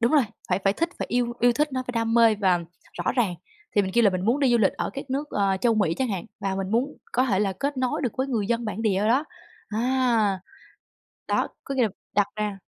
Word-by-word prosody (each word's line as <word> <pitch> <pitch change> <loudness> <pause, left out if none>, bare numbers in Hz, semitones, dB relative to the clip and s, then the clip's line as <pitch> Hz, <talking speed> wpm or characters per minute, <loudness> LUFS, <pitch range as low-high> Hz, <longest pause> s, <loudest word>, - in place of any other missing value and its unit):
đúng 235 +3 +2
rồi, 300 -3 +6 0.3
phải 180 - +2
phải 195 - +4
thích 335 +10 -1
phải - - -2
yêu 240 -1 +1
yêu 245 0 +5
thích 300 +3 0
nó, 255 0 -1
phải 250 - -3
đam 230 0 0
mê 230 -2 +6
và 190 -4 +2 0.5
rõ - - +2
ràng. 220 -9 +1 0.4
Thì 205 - +6
mình 190 -1 -3
kêu 235 - +5
là 205 - +6
mình 185 0 -2
muốn 240 +7 +2
đi 270 -3 +4
du 240 - +4
lịch 200 -4 +3
ở - - -3
các 275 -1 -7
nước, 285 +3 -2
ờ, 195 -2 +1
Châu 235 +1 +3
Mỹ 190 -7 +2
chẳng 255 +8 -1
hạn 195 -5 -3 0.2
và 195 -1 -1
mình 195 0 -3
muốn 250 +6 0 0.2
có 255 - +3
thể 205 -7 +1
là 200 -1 +1
kết 280 +9 -3
nối 255 +2 -1
được 245 -5 -1
với 260 - 0
người 230 -7 -1
dân 235 +1 0
bản 215 0 -3
địa 210 -4 +2
ở 210 - +1
đó 260 +6 +3 0.4
á, 215 0 -3
à, 235 -6 +2 0.9
đó, - - +1 0.2
có 275 - -4
nghĩa 255 - +3
là 220 - +2 0.3
đặt 205 -1 +4
ra 210 -2 -3
230 Hz, 270 wpm, -25 LUFS, 200-255 Hz, 0.9 s, rồi